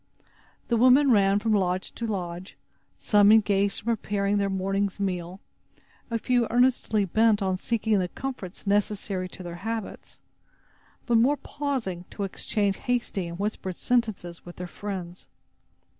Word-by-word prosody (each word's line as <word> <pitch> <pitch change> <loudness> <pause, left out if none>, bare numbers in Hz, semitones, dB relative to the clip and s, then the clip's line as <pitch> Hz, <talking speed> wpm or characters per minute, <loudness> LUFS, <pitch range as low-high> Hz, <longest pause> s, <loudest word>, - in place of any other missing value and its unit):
The 235 - +2
women 255 +3 +6
ran 200 -2 +4
from 215 +1 0
lodge 185 -2 0
to 230 - -5
lodge, 180 -3 -5 0.4
some 205 -1 +5
engaged 200 -2 +3
in - - -24
preparing 205 -3 0
their 200 0 +1
morning's 195 +1 -1
meal, 180 -1 -3 0.7
a 230 - 0
few 245 0 +1
earnestly 240 -4 +2
bent 220 +2 +3
on 185 -1 0
seeking 220 -2 +1
the 180 - 0
comforts 210 -5 -7
necessary 200 -2 0
to 185 - -10
their 175 -1 -7
habits, 225 -2 -5 0.9
but 235 -2 +3
more 275 +6 +3
pausing 260 -14 -4
to 205 - -5
exchange 200 +1 -1
hasty 240 -7 -2
and 170 0 -7
whispered 195 -2 -3
sentences 215 -9 -1
with 175 - -11
their 180 - -6
friends. 180 -1 -7
205 Hz, 145 wpm, -26 LUFS, 185-230 Hz, 0.9 s, women